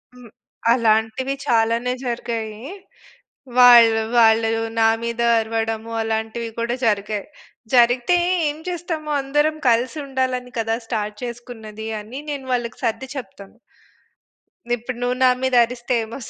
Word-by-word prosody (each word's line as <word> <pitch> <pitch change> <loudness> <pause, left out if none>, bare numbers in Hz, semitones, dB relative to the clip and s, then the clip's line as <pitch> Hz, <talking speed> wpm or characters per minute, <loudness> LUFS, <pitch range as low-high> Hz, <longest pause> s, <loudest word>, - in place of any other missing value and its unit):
హ్మ్. 245 -3 -14 0.4
అలాంటివి 225 +3 +1
చాలానే 230 +2 +1
జరిగాయి. 230 -1 -4 0.9
వాళ్ళు, 235 -3 +8 0.2
వాళ్ళు 225 -1 +5 0.3
నా 225 - +5 0.2
మీద 235 0 -3 0.2
అరవడము 225 0 -3
అలాంటివి 225 +1 -3
కూడా 235 +1 -1
జరిగాయి. 210 -1 -1 0.5
జరిగితే 245 +7 +4 0.3
ఏం 295 - -5
చేస్తాము, 335 -3 -4
"అందరం 295 +3 +1
కలిసి 240 +6 +1
ఉండాలని 255 -2 -2
కదా! 225 0 0
స్టార్ట్ 210 -2 -3
చేసుకున్నది" 225 -3 -8
అని 230 +6 -8
నేను 280 -2 -5
వాళ్ళకి 240 -2 -3
సర్ది 230 +4 -2
చెప్తాను. 200 -6 -9 1.2
ఇప్పుడు 240 +1 -7
నువ్వు 245 0 0
నా 255 - +7
మీద 260 -1 +1
అరిస్తే 240 +1 -4
ఏమొస్తుంది. 230 +3 -8
235 Hz, 120 wpm, -21 LUFS, 225-250 Hz, 1.2 s, వాళ్ళు